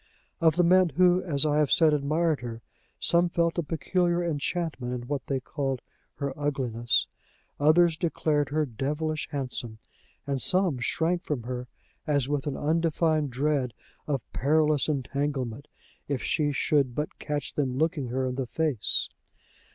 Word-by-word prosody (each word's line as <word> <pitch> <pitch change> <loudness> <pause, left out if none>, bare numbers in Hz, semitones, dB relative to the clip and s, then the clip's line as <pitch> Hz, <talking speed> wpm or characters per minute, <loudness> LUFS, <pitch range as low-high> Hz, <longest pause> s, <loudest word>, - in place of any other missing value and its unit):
Of 160 -2 +4
the 175 - +3
men 185 +1 +5
who, 180 +1 +4
as 155 -6 +4
I 150 0 +2
have 150 -3 +2
said, 160 -2 +5
admired 150 0 +1
her, 115 -1 -7 0.4
some 175 +1 +4
felt 170 0 0
a - - +3
peculiar 175 +3 0
enchantment 155 -5 -2
in 120 - -10
what 140 -1 -3
they 135 -1 0
called 135 -1 -3 0.3
her 140 -2 -3
ugliness; 125 -5 0 0.5
others 160 +2 +4
declared 150 -4 0
her 155 +1 +1
devilish 150 +5 -3
handsome; 125 -5 -4 0.5
and 140 -2 -1
some 180 -8 +3
shrank 170 +7 0
from 140 -6 -3
her 125 +1 -5 0.4
as 145 -2 +2
if - - -9
with 145 -1 -1
an 145 - -2
undefined 160 -1 +1
dread 135 -1 -1 0.3
of 140 -4 -1
perilous 150 0 +2
entanglement, 140 -2 -2 0.4
if 140 -3 -2
she 150 -1 +1
should 140 -3 +1
but 150 +1 -4
catch 145 -2 -3
them 130 -3 -1
looking 155 -3 0
her 130 +2 -1
in 130 - -2
the 130 -1 -3
face. 150 -5 0
145 Hz, 155 wpm, -27 LUFS, 130-160 Hz, 0.5 s, men